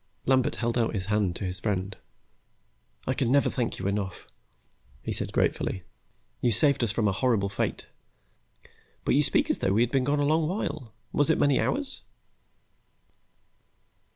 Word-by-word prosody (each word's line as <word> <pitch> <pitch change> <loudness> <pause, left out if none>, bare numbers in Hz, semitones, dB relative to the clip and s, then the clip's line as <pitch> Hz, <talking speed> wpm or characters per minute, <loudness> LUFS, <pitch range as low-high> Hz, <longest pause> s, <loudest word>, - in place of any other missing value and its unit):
Lambert 130 -1 +2
held 120 +1 -1
out 115 -1 0
his 95 -3 -2
hand 100 -5 +1
to 100 - -4
his 90 0 -3
friend. 95 -1 -2 1.1
"I 130 - +1
can 125 -2 0
never 140 +1 +3
thank 120 -3 -2
you 95 - -6
enough," 100 -1 -2 0.8
he - - -3
said - - -2
gratefully. 95 - 0 0.6
"You 120 - +3
saved 140 +4 +3
us 115 - +1
from 110 -1 +1
a - - +3
horrible 100 -1 +1
fate. 100 - -2 1.2
But - - +2
you - - +5
speak - - +2
as - - -1
though 95 - +1
we 110 - +3
had 120 0 +2
been 135 -2 +2
gone 145 +2 +1
a 145 - +2
long 155 +1 +2
while. 155 - -3 0.2
Was 145 - +2
it - - +4
many 140 -3 +3
hours?" 285 -1 -2
115 Hz, 170 wpm, -27 LUFS, 100-140 Hz, 1.2 s, you